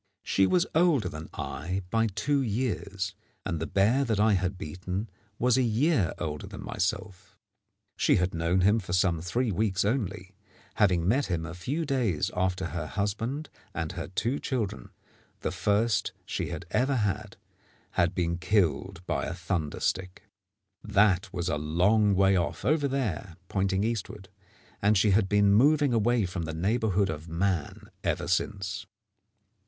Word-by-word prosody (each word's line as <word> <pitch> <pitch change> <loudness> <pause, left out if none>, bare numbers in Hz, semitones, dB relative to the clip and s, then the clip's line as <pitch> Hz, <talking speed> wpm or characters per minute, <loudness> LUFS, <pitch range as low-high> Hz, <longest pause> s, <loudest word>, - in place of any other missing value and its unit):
She 95 -1 +3
was 180 - +3
older 160 - +3
than 80 -3 -7
I 90 +7 -4
by 115 0 +3
two 135 +8 0
years, 100 -5 -2 0.3
and 85 - -2
the 80 - -3
bear 110 +8 +3
that 110 -4 0
I 105 0 +4
had 95 0 0
beaten 90 +6 -5 0.3
was 125 +1 +3
a - - +4
year 120 - +2
older 75 -3 -4
than - - -8
myself. 95 +1 -3 0.6
She - - +4
had 90 +1 +1
known 85 +3 +1
him 105 +5 +4
for 90 -4 -6
some 90 -3 +2
three 115 +7 0
weeks 95 0 +1
only, 100 -5 -2 0.4
having 90 -5 +2
met 130 +7 +2
him 85 -3 -2
a 80 - -6
few 140 - -3
days 120 - 0
after 90 0 0
her 85 -2 -4
husband 115 - -2 0.2
and 80 -2 -2
her 85 - -5
two 115 +9 -1
children, 105 - -3 0.5
the - - -1
first 105 +1 +1
she - - -3
had - - -5
ever 135 +2 +2
had, 105 -2 -1 0.5
had 85 - +1
been 85 -1 0
killed 90 0 0
by - - -1
a 85 - -4
thunder 85 -4 -2
stick. 95 0 -2 0.6
That 100 -1 +3
was 90 -3 -3
a 75 -5 0
long 95 +7 +3
way 95 0 +4
off 85 -4 -1
over 145 +1 +2
there 105 - -2
pointing 95 0 +1
eastward 105 -3 -3 0.5
and 105 +1 +4
she 100 +2 +4
had 95 0 +3
been 105 -1 +4
moving 145 +4 +4
away 115 -1 +2
from 90 -2 -4
the 80 0 -5
neighbourhood 100 +1 +1
of 80 +2 -7
man 85 -1 -2
ever - - -1
since. 100 +3 -1
100 Hz, 160 wpm, -28 LUFS, 90-110 Hz, 0.6 s, I